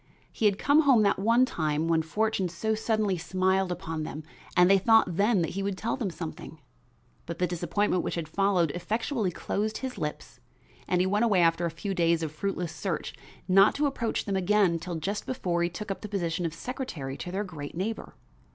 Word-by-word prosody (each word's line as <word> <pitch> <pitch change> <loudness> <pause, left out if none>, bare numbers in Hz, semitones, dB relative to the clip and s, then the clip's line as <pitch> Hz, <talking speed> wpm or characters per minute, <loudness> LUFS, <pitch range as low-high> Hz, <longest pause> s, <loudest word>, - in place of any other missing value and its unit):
He 225 - -2
had 200 -2 +4
come 285 +6 +4
home 265 -7 +5
that 200 - +2
one 230 +5 +4
time 155 -6 -1
when 165 -1 +3
fortune 200 +2 -1
so 195 +6 -1
suddenly 215 -4 0
smiled 185 +2 +1
upon 165 -3 -4
them 155 0 -6 0.3
and 180 0 +7
they 195 +1 +5
thought 220 -3 +4
then 205 -1 +3
that - - -2
he 195 - -3
would 195 -1 -2
tell 230 +4 -1
them 230 -7 -2
something; 160 -2 -8 0.7
but 170 0 -5
the 180 - +1
disappointment 180 +2 0
which - - -3
had 165 -2 -3
followed 180 -2 +2
effectually 220 - -1
closed 210 +5 -2
his 260 -1 -5
lips, 150 0 -5 0.5
and 180 - +2
he - - +2
went 205 +4 +2
away 200 -6 +3
after 165 +1 +2
a - - -2
few 170 +5 -4
days 170 -2 +2
of 155 - -3
fruitless 180 +1 -3
search, 185 +3 -3 0.3
not 195 +2 +5
to 295 - +1
approach 240 -5 -1
them 200 - -1
again 190 -2 +2
till 170 +1 -5
just 200 +6 -3
before 180 -9 -1
he 170 - +1
took 200 +4 -6
up 195 - -5
the 210 - -7
position 175 -3 -1
of 160 - -7
secretary 165 - -5
to 175 - -6
their 195 +3 -1
great 155 -7 -8
neighbor. 215 +5 -4
190 Hz, 205 wpm, -28 LUFS, 170-210 Hz, 0.7 s, and